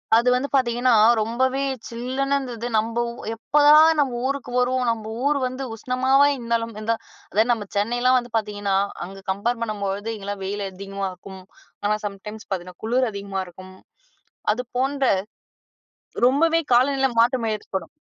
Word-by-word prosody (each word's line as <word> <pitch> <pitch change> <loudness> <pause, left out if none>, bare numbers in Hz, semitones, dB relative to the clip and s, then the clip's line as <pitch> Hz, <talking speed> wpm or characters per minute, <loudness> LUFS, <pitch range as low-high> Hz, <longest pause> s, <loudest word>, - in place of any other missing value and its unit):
அது 235 +2 +3
வந்து 255 +3 0
பார்த்தீங்கன்னா, 245 -1 +2 0.3
ரொம்பவே 260 +5 0 0.3
சில்லுன்னு 260 +4 -2
இருந்தது. 240 -3 -5
நம்போ 230 +2 +1 0.3
எப்பதான் 295 +6 +6
நம்ம 250 -4 +1
ஊருக்கு 275 -2 -4
வருவோம், 250 0 +1
நம்ம 220 -1 -5
ஊர் 290 0 +2
வந்து 255 +2 -5
உஷ்ணமாவே 260 +4 +3
இருந்தாலும், 230 -2 -2
இந்தா 230 +1 +1 0.4
அதாவது 220 +4 +2
நம்ம 210 -4 -1
சென்னைலாம் 245 +5 +2
வந்து 240 -1 -10
பார்த்தீங்கன்னா, 205 -2 -2 0.3
அங்க 195 +1 -11
கம்பேர் 230 +5 -1
பண்ணும்பொழுது, 205 0 -3
இங்கலாம் 200 0 -6
வெயில் 200 +1 -3
அதிகமா 195 +1 -5
இருக்கும். 190 +1 -12 0.4
ஆனா, 210 +1 +2
சம்டைம்ஸ் 210 +2 -7
பார்த்தீங்கன்னா, 180 -2 -5
குளுர் 250 +1 +1
அதிகமா 200 -1 -4
இருக்கும். 185 +1 -13 0.8
அது 250 +3 -3
போன்ற 270 +1 0 1.2
ரொம்பவே 325 +5 +3
காலநில 270 +2 +4
மாற்றம் 235 0 +3
ஏற்படும். 190 -4 -5
235 Hz, 135 wpm, -23 LUFS, 205-260 Hz, 1.2 s, எப்பதான்